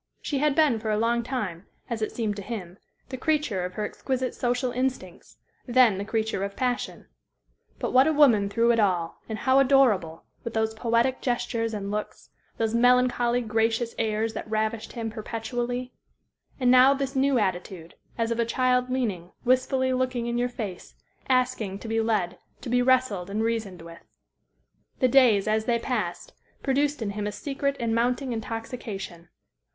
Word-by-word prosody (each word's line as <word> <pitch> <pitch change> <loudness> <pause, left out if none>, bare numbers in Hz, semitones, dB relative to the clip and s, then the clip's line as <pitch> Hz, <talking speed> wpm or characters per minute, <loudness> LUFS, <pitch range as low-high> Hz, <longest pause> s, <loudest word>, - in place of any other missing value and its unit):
She 280 - -1
had 295 -1 +2
been 300 -8 +3
for 220 0 -4
a 210 - +1
long 235 +2 +1
time, 210 -8 -4 0.2
as 235 -3 -4
it 215 - -1
seemed 215 -3 -2
to - - -5
him, 190 -4 -7 0.3
the 260 -1 -6
creature 295 - 0
of 180 - -6
her 210 - -2
exquisite 260 +3 -3
social 245 0 -1
instincts 250 -8 -4 0.3
then 240 -5 +4
the - - -2
creature 220 -2 -1
of 200 0 -4
passion. 250 -2 -2 0.7
But - - -3
what 260 +3 +6
a - - +4
woman 245 -10 +4
through 230 +3 +3
it 230 - +2
all, 180 -5 0
and 220 - -3
how 260 +3 +3
adorable, 245 -12 +3 0.2
with 235 - -6
those 220 0 +1
poetic 235 +3 +1
gestures 240 -2 -1
and 200 -2 -4
looks, 210 0 -5 0.3
those 225 -1 0
melancholy, 245 0 +3
gracious 225 +1 0
airs 220 0 0
that - - -6
ravished 220 0 -2
him 225 -2 -4
perpetually! 240 +3 -4 0.7
And 250 -1 +4
now 255 +2 +7
this 275 0 -3
new 270 0 +3
attitude, 185 -4 -3 0.2
as 230 0 0
of 230 - -1
a - - +4
child 250 +1 +1
leaning, 205 -9 -2
wistfully 260 +1 +2
looking 255 -2 -1
in 235 0 -2
your 245 0 +1
face, 210 -7 -7 0.3
asking 250 -6 +1
to 225 - -9
be 225 0 +1
led, 210 -6 -1 0.2
to - - -6
be 245 0 +3
wrestled 245 -8 +2
and 215 +2 -1
reasoned 220 -7 -2
with. 170 0 -11 1.0
The 255 - +3
days, 240 -6 +5
as 215 0 +1
they 235 -1 +2
passed, 225 -7 -3 0.3
produced 280 -1 +1
in 200 - -2
him 205 0 -3
a - - -2
secret 280 +4 -2
and 230 -1 0
mounting 245 +2 0
intoxication. 220 -6 -6
230 Hz, 175 wpm, -26 LUFS, 215-255 Hz, 1.0 s, now